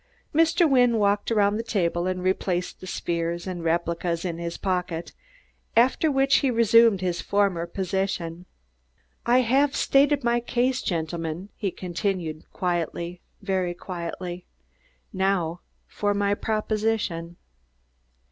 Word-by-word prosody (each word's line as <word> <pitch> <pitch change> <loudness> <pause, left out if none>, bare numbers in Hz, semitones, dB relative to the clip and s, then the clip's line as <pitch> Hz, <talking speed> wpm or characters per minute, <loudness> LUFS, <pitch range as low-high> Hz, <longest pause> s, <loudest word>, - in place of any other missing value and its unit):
Mr. 330 +2 +4
Wynne 245 -4 +4
walked 205 -1 +1
around 205 -1 +3
the 225 - -2
table 175 -5 0
and 185 -1 -2
replaced 185 -1 -1
the 185 - -8
spheres 170 -1 -2
and 180 -3 -5
replicas 170 +1 -1
in 170 -2 -3
his 170 0 -4
pocket, 180 -3 -2 0.7
after 260 +6 +4
which 270 0 +4
he 275 - +2
resumed 230 -3 +5
his 180 -2 -1
former 195 -4 +1
position. 180 -2 -3 0.8
"I 245 +2 +5
have 270 +4 +2
stated 280 0 +3
my 235 0 +2
case, 250 +2 0
gentlemen," 165 +1 -3
he 200 - -2
continued 175 -3 -4
quietly, 175 0 -2 0.2
very 185 -3 -1
quietly. 175 0 -6 0.7
"Now 185 -3 0 0.2
for 205 -1 -1
my 200 0 +1
proposition. 215 -5 -1
190 Hz, 120 wpm, -25 LUFS, 175-225 Hz, 0.8 s, resumed